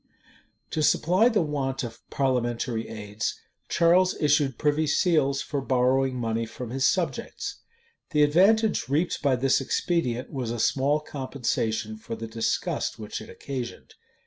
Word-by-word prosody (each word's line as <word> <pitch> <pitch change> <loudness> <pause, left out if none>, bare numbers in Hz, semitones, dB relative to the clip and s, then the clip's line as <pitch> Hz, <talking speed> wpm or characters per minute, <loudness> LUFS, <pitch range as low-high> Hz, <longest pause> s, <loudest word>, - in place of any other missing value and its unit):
To 155 - -1
supply 180 +9 +4
the 215 -7 +2
want 135 -3 -2
of 115 -1 -7
parliamentary 120 -3 -1
aids, 105 0 -4 0.3
Charles 180 +2 +4
issued 145 -4 +2
privy 150 +1 +1
seals 145 -3 +2
for 140 -2 -3
borrowing 130 0 +2
money 115 -1 -1
from 120 +1 -7
his 135 +2 +2
subjects.[*] 190 +6 -2 0.5
The 150 -4 +3
advantage 195 - +3
reaped 155 +6 0
by 140 -3 +3
this 135 +2 +2
expedient 130 -4 -1
was 130 -4 -3
a 120 - -3
small 140 +6 +2
compensation 120 -6 -2
for 115 +1 -6
the 115 0 -6
disgust 115 0 -2
which 105 -1 -6
it 110 - -11
occasioned. 130 -4 -6
135 Hz, 140 wpm, -26 LUFS, 120-150 Hz, 0.5 s, supply